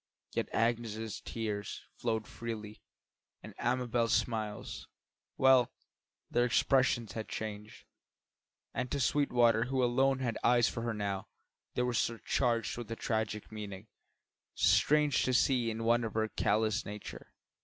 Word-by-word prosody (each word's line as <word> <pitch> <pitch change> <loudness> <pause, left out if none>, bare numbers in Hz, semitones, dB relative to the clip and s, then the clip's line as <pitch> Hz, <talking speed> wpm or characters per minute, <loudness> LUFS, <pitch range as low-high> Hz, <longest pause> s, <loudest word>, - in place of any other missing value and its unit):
Yet - - -1
Agnes's 115 -2 -1
tears 105 -3 -4
flowed 110 -2 -1
freely, 110 -3 -7 0.6
and - - -9
Amabel's 120 -2 +1
smiles 110 -3 -2 0.5
well, 130 -2 +5 0.6
their 120 - +3
expression 125 0 +3
had 110 0 -6
changed; 105 -1 -6 0.9
and 125 -1 -2
to 140 - -1
Sweetwater, 120 -4 +3
who 130 0 0
alone 130 +2 +3
had 120 -4 -2
eyes 120 -1 +5
for 115 - -3
her 115 -1 -2
now, 100 -2 -3 0.5
they 125 - +1
were 125 0 0
surcharged 115 +1 0
with 120 -2 -7
a 115 - -3
tragic 110 -2 -2
meaning, 105 -1 -7 0.7
strange 140 +10 +4
to 130 - +1
see 125 -2 +3
in 115 0 -3
one 120 +1 +3
of 110 -2 -4
her 110 0 +1
callous 110 +1 +1
nature. 100 -12 -9
115 Hz, 135 wpm, -32 LUFS, 110-125 Hz, 0.9 s, well